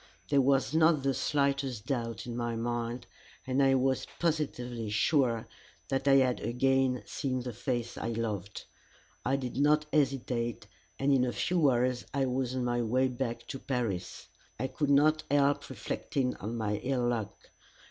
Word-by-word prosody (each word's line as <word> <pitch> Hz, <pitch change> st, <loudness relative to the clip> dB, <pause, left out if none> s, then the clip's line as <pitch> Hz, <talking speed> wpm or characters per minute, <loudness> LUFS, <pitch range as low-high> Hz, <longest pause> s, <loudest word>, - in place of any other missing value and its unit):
There 140 Hz, -1 st, +4 dB
was 135 Hz, -1 st, +2 dB
not 160 Hz, -3 st, +4 dB
the 135 Hz, 0 st, +2 dB
slightest 140 Hz, -4 st, 0 dB
doubt 115 Hz, -4 st, -3 dB
in 120 Hz, -1 st, -5 dB
my 120 Hz, -1 st, -2 dB
mind, 120 Hz, +1 st, -3 dB, 0.4 s
and 130 Hz, +1 st, +1 dB
I 135 Hz, -1 st, +5 dB
was 130 Hz, 0 st, +1 dB
positively 125 Hz, -9 st, -2 dB
sure 115 Hz, +1 st, +2 dB, 0.4 s
that 135 Hz, +1 st, -1 dB
I 135 Hz, -, +7 dB
had 130 Hz, -2 st, +3 dB
again 130 Hz, +1 st, +1 dB
seen 130 Hz, -3 st, -2 dB
the 125 Hz, -1 st, -5 dB
face 120 Hz, 0 st, -3 dB
I -, -, -3 dB
loved. 110 Hz, -4 st, -3 dB, 0.6 s
I 135 Hz, -, +1 dB
did 130 Hz, -3 st, -4 dB
not 150 Hz, +2 st, +3 dB
hesitate, 130 Hz, -5 st, 0 dB, 0.3 s
and 140 Hz, +1 st, +2 dB
in 130 Hz, -2 st, +4 dB
a 125 Hz, -, 0 dB
few 165 Hz, +2 st, +2 dB
hours 125 Hz, 0 st, 0 dB
I 135 Hz, -1 st, +2 dB
was 130 Hz, 0 st, -1 dB
on 125 Hz, -1 st, -1 dB
my 120 Hz, 0 st, 0 dB
way 130 Hz, +3 st, +2 dB
back 120 Hz, -1 st, -4 dB
to 135 Hz, -, -5 dB
Paris. 110 Hz, -10 st, -3 dB, 0.3 s
I 130 Hz, -, -1 dB
could 145 Hz, +2 st, -1 dB
not 150 Hz, +2 st, +4 dB
help 145 Hz, 0 st, +2 dB
reflecting 130 Hz, -3 st, -2 dB
on 110 Hz, +4 st, -4 dB
my 105 Hz, -2 st, -1 dB
ill 125 Hz, +1 st, 0 dB
luck. 115 Hz, -4 st, -4 dB
130 Hz, 165 wpm, -30 LUFS, 120-140 Hz, 0.6 s, I